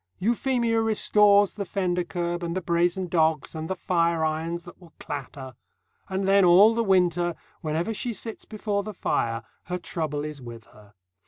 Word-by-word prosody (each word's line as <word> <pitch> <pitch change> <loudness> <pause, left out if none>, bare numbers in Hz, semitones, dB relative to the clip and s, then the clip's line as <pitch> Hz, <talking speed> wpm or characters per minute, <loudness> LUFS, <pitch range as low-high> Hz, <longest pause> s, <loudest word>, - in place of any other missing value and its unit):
Euphemia 235 +1 +1
restores 210 -2 +4
the 205 - -4
fender 180 -2 -1
kerb 175 0 -3
and 170 0 -3
the 185 - -1
brazen 175 +2 +1
dogs 160 -3 +1
and 160 0 -5
the 190 - -1
fireirons 170 -2 0
that 175 +1 -14
will 170 -2 -17
clatter; 135 -1 -7 0.6
and 190 0 -2
then 195 0 +5
all 190 +5 +7
the 230 0 0
winter, 175 -3 +2 0.3
whenever 165 +6 -2
she 240 +3 -3
sits 225 +1 -6
before 210 -2 -3
the 210 0 -8
fire, 115 -8 -1 0.2
her 180 - -3
trouble 150 -4 -3
is 150 -2 -7
with 115 -2 -9
her. 105 -1 -19
175 Hz, 165 wpm, -25 LUFS, 160-200 Hz, 0.6 s, all